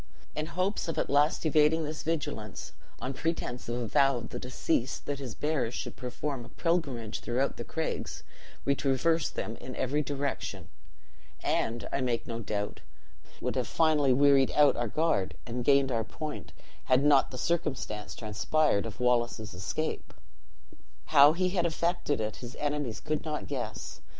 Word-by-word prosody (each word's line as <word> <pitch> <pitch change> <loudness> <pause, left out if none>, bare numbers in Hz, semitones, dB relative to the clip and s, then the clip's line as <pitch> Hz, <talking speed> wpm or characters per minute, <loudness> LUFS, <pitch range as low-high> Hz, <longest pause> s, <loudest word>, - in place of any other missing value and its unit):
In 155 +1 -2
hopes 185 +3 -1
of 165 - -3
at - - 0
last 145 +4 +3
evading 155 +1 +4
this 155 0 -4
vigilance, 145 -10 -3 0.3
on 130 - -3
pretense 130 -5 -3
of 120 - -1
a 120 -1 -2
vow 135 +3 +4
of 115 -1 -6
the - - -5
deceased 125 +1 -1
that 145 -1 -2
his 130 -5 -6
bearers 145 -6 0
should - - -5
perform 130 +1 -4
a - - -12
pilgrimage 140 -11 -1
throughout 125 +3 -1
the 120 - -4
craigs, 160 +6 -3 0.4
we 140 - +4
traversed 140 +4 +1
them 110 - -3
in 130 - -8
every 145 +4 +1
direction; 140 -1 -3 0.7
and, 115 -2 0
I 140 - 0
make 120 -2 0
no 115 -1 -4
doubt, 105 -1 -3 0.6
would - - -1
have - - 0
finally 155 -4 +3
wearied 135 0 +5
out 145 -1 +6
our 120 0 -1
guard, 110 - +1
and 120 +1 -3
gained 140 0 +4
our 115 -2 +1
point, 150 +7 -6 0.3
had 130 +1 +4
not 145 -2 +5
the 130 - -7
circumstance 135 -9 -2
transpired 110 +2 +1
of 110 - -8
Wallace's 120 -3 +1
escape. 100 - -3 0.9
"'How 145 - +7
he 185 +2 +1
had 175 -2 +1
effected 170 -3 0
it, 110 -1 -2
his 120 0 -8
enemies 145 -6 -2
could 155 0 -2
not 150 -9 -3
guess. - - -5
140 Hz, 165 wpm, -30 LUFS, 120-155 Hz, 0.9 s, How